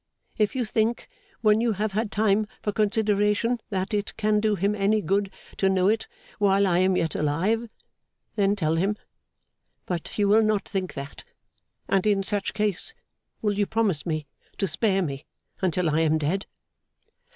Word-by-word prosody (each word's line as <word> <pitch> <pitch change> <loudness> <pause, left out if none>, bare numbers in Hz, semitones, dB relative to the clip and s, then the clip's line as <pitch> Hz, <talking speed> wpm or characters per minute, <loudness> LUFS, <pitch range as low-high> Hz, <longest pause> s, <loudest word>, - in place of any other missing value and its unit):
If 210 +2 +1
you 250 -2 0
think, 220 +2 0 0.3
when 215 0 +4
you 235 -1 +2
have 210 +2 -1
had 215 +2 -1
time 215 -1 +2 0.2
for 210 - 0
consideration, 210 +2 +1
that 190 +1 -2
it 205 0 -2
can 210 -1 +2
do 215 -1 +2
him 200 +2 +1
any 210 +1 +2
good 195 +2 0 0.3
to 195 - +2
know 190 0 +3
it 220 +1 0 0.3
while 200 -1 +4
I 175 -2 +2
am 185 0 +3
yet 160 -2 0
alive, 190 +11 0 0.7
then 200 -1 +2
tell 165 -4 0
him. 200 +5 +1 0.9
But 175 -3 -4
you 205 -1 +3
will 215 +2 +5
not 215 -2 +1
think 190 -2 -3
that; 140 0 -7 0.6
and 195 +1 +2
in 200 -2 +2
such 205 0 -2
case, 210 - -1 0.5
will 210 -1 +2
you 205 0 0
promise 210 -9 0
me 155 -3 -2 0.3
to 195 - 0
spare 195 +2 +1
me 140 -3 -5 0.3
until 180 -1 +1
I 155 0 +2
am 160 -1 +3
dead? 160 +6 -1
200 Hz, 170 wpm, -25 LUFS, 185-215 Hz, 0.9 s, will